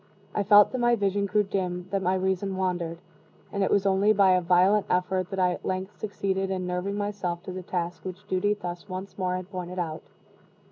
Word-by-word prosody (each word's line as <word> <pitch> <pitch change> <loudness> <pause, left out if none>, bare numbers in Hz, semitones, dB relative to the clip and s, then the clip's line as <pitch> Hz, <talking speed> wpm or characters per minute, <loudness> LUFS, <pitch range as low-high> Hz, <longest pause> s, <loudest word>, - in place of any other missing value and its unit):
I - - 0
felt 205 0 +7
that 255 - -2
my 240 0 +4
vision 200 -1 0
grew 210 +2 +2
dim, 180 -2 -3
that 195 -1 0
my 185 0 +1
reason 190 +1 -1
wandered; 175 -3 -1 0.6
and 200 -1 0
it - - +1
was 200 -1 +2
only 195 +2 +4
by 195 -2 +5
a 185 0 +4
violent 185 +4 +4
effort 185 0 0
that 195 - -5
I 180 -1 +3
at - - -6
length 185 +2 -3
succeeded 195 -2 -2
in 185 -1 -2
nerving 180 +2 -2
myself 200 -4 -3
to - - -6
the 185 0 -5
task 175 -1 -4
which 185 -1 -8
duty 205 +3 +1
thus 175 0 -7
once 185 +2 -6
more 180 -1 0
had 185 +1 -6
pointed 180 -1 -5
out. 160 -3 -3
190 Hz, 215 wpm, -27 LUFS, 180-200 Hz, 0.6 s, felt